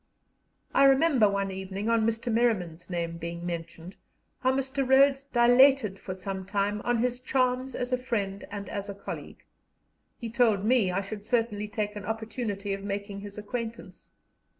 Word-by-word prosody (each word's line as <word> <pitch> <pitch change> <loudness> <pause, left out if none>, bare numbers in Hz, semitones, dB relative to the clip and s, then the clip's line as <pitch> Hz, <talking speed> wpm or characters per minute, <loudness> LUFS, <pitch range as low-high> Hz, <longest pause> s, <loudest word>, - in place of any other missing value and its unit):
I 275 - +6
remember 270 -5 +5
one 200 -1 -1
evening, 190 +2 -5
on 230 -1 +3
Mr. 230 +1 -1
Merriman's 190 -9 0
name 170 -1 -3
being 170 +1 -5
mentioned, 170 +1 -6 0.4
how 260 - +2
Mr. 270 +1 -1
Rhodes 275 +1 +5
dilated 245 -4 +5
for 185 - -6
some 190 0 -5
time 205 +2 -1
on 240 0 +1
his 245 +1 0
charms 255 0 0
as 245 +1 -2
a 250 - +2
friend 205 -6 -2
and 200 -1 -6
as 200 0 -5
a 200 - -5
colleague; 200 - -8 0.7
he 235 - -5
told 220 -5 +3
me 230 -5 +3
I 180 +2 0
should 205 +1 -7
certainly 215 -2 0
take 210 0 -3
an 205 -1 -6
opportunity 220 -2 -3
of 195 0 -5
making 200 0 -4
his 205 0 -9
acquaintance. 225 -2 -6
210 Hz, 165 wpm, -28 LUFS, 195-245 Hz, 0.7 s, I